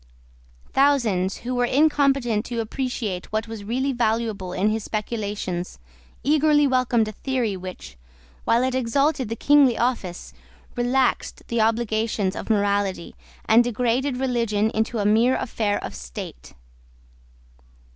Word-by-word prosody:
Thousands 235 Hz, -10 st, +2 dB
who 250 Hz, -, -2 dB
were 245 Hz, 0 st, +2 dB
incompetent 275 Hz, -5 st, +2 dB
to 235 Hz, -1 st, -4 dB
appreciate 225 Hz, -5 st, -3 dB
what 220 Hz, +1 st, -1 dB
was 225 Hz, -2 st, -7 dB
really 255 Hz, +6 st, -1 dB
valuable 220 Hz, -5 st, -1 dB
in 190 Hz, +3 st, +1 dB
his 220 Hz, -1 st, -2 dB
speculations, 205 Hz, -5 st, -4 dB, 0.5 s
eagerly 295 Hz, 0 st, +4 dB
welcomed 255 Hz, -4 st, +2 dB
a -, -, -4 dB
theory 240 Hz, -2 st, -2 dB
which, 180 Hz, -, -9 dB, 0.5 s
while 235 Hz, +2 st, +2 dB
it 260 Hz, 0 st, 0 dB
exalted 260 Hz, +1 st, +1 dB
the 230 Hz, -, -2 dB
kingly 275 Hz, -1 st, +4 dB
office, 230 Hz, -8 st, -2 dB, 0.4 s
relaxed 250 Hz, +1 st, 0 dB
the 235 Hz, -1 st, +1 dB
obligations 220 Hz, -3 st, 0 dB
of -, -, -6 dB
morality, 200 Hz, -4 st, 0 dB, 0.3 s
and 225 Hz, +2 st, +5 dB
degraded 245 Hz, +3 st, 0 dB
religion 230 Hz, -5 st, 0 dB
into 220 Hz, +2 st, -1 dB
a 205 Hz, -, -1 dB
mere 225 Hz, +5 st, +4 dB
affair 215 Hz, -4 st, -1 dB
of -, -, -5 dB
state. 65 Hz, -1 st, -9 dB
230 Hz, 125 wpm, -23 LUFS, 210-255 Hz, 0.5 s, and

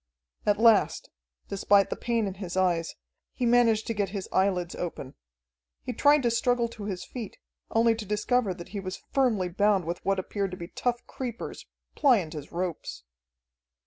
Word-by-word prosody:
At 205 Hz, 0 st, +4 dB
last, 225 Hz, -1 st, +4 dB, 0.4 s
despite 200 Hz, 0 st, +3 dB
the -, -, 0 dB
pain 235 Hz, -2 st, 0 dB
in 195 Hz, -, -3 dB
his 185 Hz, -2 st, -6 dB
eyes, 175 Hz, -3 st, +1 dB, 0.4 s
he 250 Hz, -, -2 dB
managed 235 Hz, -2 st, +4 dB
to 230 Hz, -, -2 dB
get 200 Hz, -3 st, -1 dB
his 195 Hz, -1 st, -5 dB
eyelids 185 Hz, -2 st, +1 dB
open. 150 Hz, -6 st, -5 dB, 0.7 s
He 250 Hz, -, -4 dB
tried 290 Hz, +4 st, +4 dB
to 235 Hz, -, +2 dB
struggle 240 Hz, +1 st, +2 dB
to 220 Hz, -3 st, -8 dB
his 190 Hz, -3 st, -4 dB
feet, 235 Hz, -5 st, -7 dB, 0.3 s
only 230 Hz, 0 st, +4 dB
to 225 Hz, -1 st, -5 dB
discover 210 Hz, +1 st, +1 dB
that 175 Hz, -1 st, -10 dB
he 205 Hz, -, -5 dB
was 185 Hz, -1 st, -6 dB
firmly 235 Hz, -9 st, +2 dB
bound 195 Hz, 0 st, +2 dB
with 170 Hz, +2 st, -4 dB
what 195 Hz, 0 st, +1 dB
appeared 195 Hz, +1 st, -2 dB
to 185 Hz, -, -7 dB
be 170 Hz, 0 st, -7 dB
tough 240 Hz, -1 st, -2 dB
creepers, 245 Hz, -3 st, -6 dB, 0.3 s
pliant 215 Hz, -, +3 dB
as 150 Hz, -2 st, -8 dB
ropes. 170 Hz, -, -4 dB
205 Hz, 175 wpm, -27 LUFS, 185-235 Hz, 0.7 s, At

